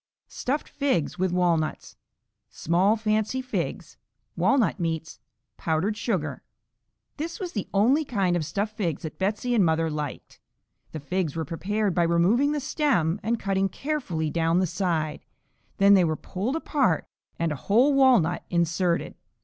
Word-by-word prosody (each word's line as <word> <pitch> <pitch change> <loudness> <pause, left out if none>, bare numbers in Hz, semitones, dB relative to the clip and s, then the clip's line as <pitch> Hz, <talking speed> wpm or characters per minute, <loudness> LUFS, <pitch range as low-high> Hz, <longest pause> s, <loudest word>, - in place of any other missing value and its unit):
Stuffed 285 +4 -3
Figs 260 - -1
with 185 -1 +1
Walnuts 170 -3 0 0.5
Small 185 +6 +2
fancy 215 +3 0
figs. 255 0 -4 0.4
Walnut 250 -7 +2
meats. 160 -1 -3 0.4
Powdered 165 +6 0
sugar. 180 - -2 0.8
This 330 +6 -5
was 365 -3 -4
the 205 - -4
only 245 +10 +3
kind 195 -10 0
of 170 - 0
stuffed 205 +7 -3
figs 175 - -2
that 160 - -7
Betsey 210 +6 -1
and 220 -5 +4
mother 160 -1 +1
liked. 150 -2 -6 0.5
The 155 - -5
figs 165 +1 -2
were 160 -1 -2
prepared 205 +3 -1
by 175 - +1
removing 175 - +3
the 300 - -1
stem 250 - +1
and 230 +2 -1
cutting 195 0 0
carefully 185 - -3
down 165 +1 +1
the 185 - +3
side, 170 -3 -2 0.5
then 200 0 +6
they 190 -2 +6
were 160 -2 +1
pulled 205 - -3
apart 275 - +1 0.3
and 165 -1 0
a - - -2
whole 235 - +3
walnut 250 -11 +4
inserted. 170 0 0
190 Hz, 150 wpm, -26 LUFS, 165-235 Hz, 0.8 s, then